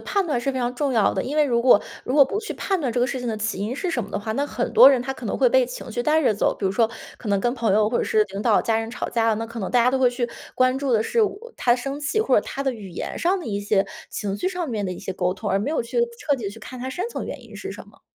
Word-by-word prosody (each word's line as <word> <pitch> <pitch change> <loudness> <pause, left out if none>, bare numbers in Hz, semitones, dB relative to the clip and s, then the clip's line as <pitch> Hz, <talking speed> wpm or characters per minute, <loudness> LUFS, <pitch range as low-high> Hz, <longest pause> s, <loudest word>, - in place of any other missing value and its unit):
判 400 -2 0
断 285 -7 0
是 275 - 0
非 260 - -3
常 245 0 -1
重 280 0 -1
要 220 -3 +3
的， 190 - -1
因 285 +4 -4
为 305 - +5
如 240 -4 +1
果 240 -4 +6 0.2
如 255 - -2
果 285 -2 +8
不 410 +10 -3
去 435 - -5
判 385 -3 -1
断 260 -5 -1
这 235 - -1
个 245 - +3
事 265 - -3
情 245 - -3
的 220 - -2
起 215 -1 -2
因 215 +6 -3
是 360 +3 -2
什 - - -1
么 200 - -9
的 - - -2
话， 220 +1 -4
那 280 +6 -1
很 245 - -3
多 250 +3 +10
人 260 - +2
他 265 +1 -3
可 255 - -8
能 - - -1
会 260 - +3
被 255 +1 +4
情 250 -1 -8
绪 240 +2 -1
带 310 +3 +3
着 255 - +4
走。 - - +1
比 - - -4
如 190 - +1
说 225 +2 +2 0.3
可 220 - -7
能 200 - +2
跟 240 +5 0
朋 230 -5 0
友 210 0 +3
或 240 - +1
者 - - 0
是 435 -2 +3
领 200 - -4
导、 220 -2 +3
家 225 -1 +1
人 225 0 -4
吵 - - -4
架， 225 -2 +2
那 225 - -3
可 235 0 -8
能 195 - -3
大 245 -2 +4
家 250 - +4
都 265 - +1
会 260 -1 +5
去 245 0 -2 0.3
关 255 0 +3
注 275 -2 -2
的 220 -2 +3
是 465 - 0
我 450 +2 -1
他 240 -1 +3
生 275 +3 -5
气， 295 +9 -1
或 445 - +2
者 - - +5
他 275 - -4
的 270 - 0
语 210 -5 -9
言 175 - -5
上 370 +3 +1
的 355 - -8
一 205 -2 -2
些， 200 -1 +1 0.2
情 200 -2 -3
绪 370 - 0
上 360 -2 -3
面 210 -4 -2
的 185 - -3
一 180 - -8
些 190 - -5
沟 180 0 -1
通， - - -4
而 195 - +2
没 215 +9 -2
有 315 - 0
去 235 - -3 0.2
彻 290 - +1
底 240 - -7
地 200 - -2
去 215 - -11
看 250 +3 -9
它 260 - -4
深 360 - -3
层 - - -5
原 - - -7
因 - - -14
是 - - -6
什 - - -9
么。 - - -21
245 Hz, 375 characters per minute, -23 LUFS, 220-280 Hz, 0.3 s, 多